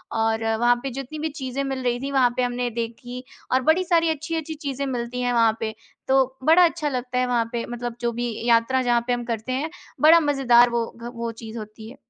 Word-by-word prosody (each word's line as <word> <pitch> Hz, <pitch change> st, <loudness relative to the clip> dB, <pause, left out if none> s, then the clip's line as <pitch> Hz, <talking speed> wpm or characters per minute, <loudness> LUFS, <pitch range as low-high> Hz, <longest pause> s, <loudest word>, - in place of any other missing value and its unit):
और 225 Hz, 0 st, +1 dB, 0.2 s
वहाँ 240 Hz, 0 st, +4 dB
पे 270 Hz, -, -2 dB
जितनी 275 Hz, +4 st, -6 dB
भी 315 Hz, +1 st, -2 dB
चीज़ें 275 Hz, -1 st, -4 dB
मिल 265 Hz, -1 st, -3 dB
रही 245 Hz, 0 st, 0 dB
थी, 275 Hz, +1 st, -4 dB
वहाँ 260 Hz, -3 st, +4 dB
पे 250 Hz, -, +2 dB
हमने 245 Hz, 0 st, -1 dB
देखी 240 Hz, +2 st, -5 dB, 0.3 s
और 260 Hz, +1 st, +3 dB
बड़ी 330 Hz, +6 st, +3 dB
सारी 335 Hz, -2 st, +2 dB
अच्छी-अच्छी 320 Hz, +1 st, -3 dB
चीज़ें 280 Hz, -2 st, -4 dB
मिलती 250 Hz, -1 st, -3 dB
हैं 245 Hz, 0 st, 0 dB
वहाँ 225 Hz, -1 st, +3 dB
पे। 220 Hz, -1 st, -3 dB, 0.4 s
तो 265 Hz, 0 st, +2 dB
बड़ा 330 Hz, +4 st, +6 dB
अच्छा 325 Hz, -3 st, -1 dB
लगता 250 Hz, -1 st, -3 dB
है 250 Hz, -, +1 dB
वहाँ 235 Hz, -2 st, +1 dB
पे 235 Hz, -1 st, -3 dB
मतलब 240 Hz, -1 st, -5 dB
जो 235 Hz, 0 st, 0 dB
भी 240 Hz, 0 st, -2 dB, 0.2 s
यात्रा 235 Hz, +3 st, +3 dB
जहाँ 240 Hz, -1 st, +2 dB
पे 245 Hz, -, +2 dB
हम 240 Hz, 0 st, -2 dB
करते 230 Hz, +2 st, -3 dB
हैं 295 Hz, +5 st, -2 dB, 0.3 s
बड़ा 325 Hz, +2 st, +8 dB
मज़ेदार 255 Hz, -5 st, +4 dB
वो 235 Hz, -1 st, 0 dB, 0.2 s
ग 240 Hz, -, -5 dB
वो 230 Hz, 0 st, -3 dB
चीज़ 225 Hz, +1 st, -7 dB
होती 215 Hz, +1 st, -10 dB
है। -, -, -12 dB
250 Hz, 230 wpm, -23 LUFS, 235-275 Hz, 0.4 s, बड़ा